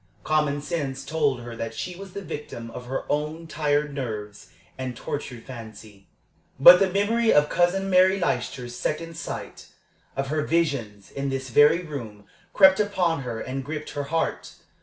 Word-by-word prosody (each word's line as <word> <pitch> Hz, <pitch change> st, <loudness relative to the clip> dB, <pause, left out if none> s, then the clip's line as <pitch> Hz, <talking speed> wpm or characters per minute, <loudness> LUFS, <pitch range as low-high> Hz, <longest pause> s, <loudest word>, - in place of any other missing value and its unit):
Common 150 Hz, -2 st, +1 dB
sense 140 Hz, -4 st, -3 dB
told 145 Hz, -6 st, 0 dB
her 120 Hz, -1 st, -8 dB
that 115 Hz, 0 st, -5 dB
she 180 Hz, -1 st, -5 dB
was 190 Hz, 0 st, -10 dB
the 200 Hz, -, -6 dB
victim 120 Hz, -8 st, -7 dB
of 125 Hz, +1 st, -9 dB
her 135 Hz, -, -3 dB
own 150 Hz, +3 st, -2 dB
tired 150 Hz, -2 st, 0 dB
nerves 110 Hz, -6 st, -5 dB, 0.3 s
and 130 Hz, -2 st, -5 dB
tortured 125 Hz, -4 st, -5 dB
fancy. 110 Hz, -5 st, -11 dB, 0.5 s
But 175 Hz, +6 st, +10 dB
the 195 Hz, -, +3 dB
memory 220 Hz, +4 st, +2 dB
of 150 Hz, 0 st, +4 dB
Cousin 180 Hz, +3 st, +2 dB
Mary 190 Hz, +1 st, +4 dB
Leicester's 125 Hz, -5 st, -2 dB
second 165 Hz, +4 st, -3 dB
sight, 165 Hz, -, -7 dB, 0.5 s
of 135 Hz, 0 st, -2 dB
her 155 Hz, +1 st, 0 dB
"visions" 140 Hz, -11 st, -1 dB
in 140 Hz, 0 st, -3 dB
this 135 Hz, -1 st, -4 dB
very 150 Hz, +7 st, +5 dB
room, 115 Hz, -10 st, -8 dB, 0.3 s
crept 190 Hz, -1 st, +6 dB
upon 185 Hz, -7 st, +1 dB
her 120 Hz, -3 st, -5 dB
and 130 Hz, +1 st, -4 dB
gripped 150 Hz, +2 st, -5 dB
her 145 Hz, -1 st, -4 dB
heart. 165 Hz, +3 st, -2 dB
145 Hz, 160 wpm, -25 LUFS, 125-170 Hz, 0.5 s, But